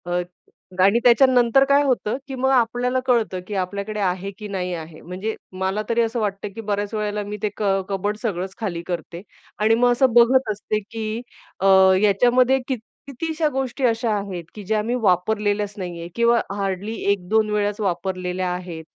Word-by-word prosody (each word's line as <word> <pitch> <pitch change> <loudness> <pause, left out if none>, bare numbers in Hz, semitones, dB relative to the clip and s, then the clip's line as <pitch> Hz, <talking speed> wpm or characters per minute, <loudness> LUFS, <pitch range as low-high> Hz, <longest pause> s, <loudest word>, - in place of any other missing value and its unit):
अ, 175 0 0 0.6
आणि 200 +5 +5
त्याच्यानंतर 250 +1 +5
काय 280 +1 +5
होतं, 255 -4 0
की 270 - -5
मग 265 +1 +1
आपल्याला 250 0 +2
कळतं, 230 -7 +1
की 210 - -6
आपल्याकडे 200 +3 -4
आहे 190 0 -1
की 210 - -7
नाही 185 -3 -3
आहे. 160 -2 -8
म्हणजे 190 +5 -4 0.3
मला 190 +3 0
तरी 235 0 +2
असं 230 +1 -1
वाटतं, 205 -1 -2
की 225 - -5
बऱ्याच 205 0 -2
वेळेला 210 -1 -2
मी 205 +1 -6
ते 210 - +2
क - - -3 0.3
कबोर्ड 200 +2 -2
सगळंच 190 -4 -3
खाली 185 -7 -3
करते. 170 0 -5 0.4
आणि 220 +2 +4
मग 245 +1 +3
असं 245 0 +3
बघत 240 +1 +5
असते, 210 +1 -2
की 220 +1 -5 0.4
अ, 195 - -1 0.4
याच्यामध्ये 245 +6 +4
कित 260 -3 -2 0.3
कितीशा 315 +4 -2
गोष्टी 270 0 -3
अशा 230 -1 +1
आहेत, 195 -4 -5
की 210 - -8
ज्या 215 +3 0
आम्ही 230 +4 -1
वापरलेल्याच 205 +1 +1
नाही 175 -3 -5
आहे 170 - -6
किंवा 235 0 +4 0.2
हार्डली 195 +1 -3 0.2
1-2 210 +3 +1
वेळाच 210 0 0
वापरलेल्या 185 -1 -2
आहेत. 175 -3 -6
210 Hz, 175 wpm, -22 LUFS, 190-235 Hz, 0.6 s, आणि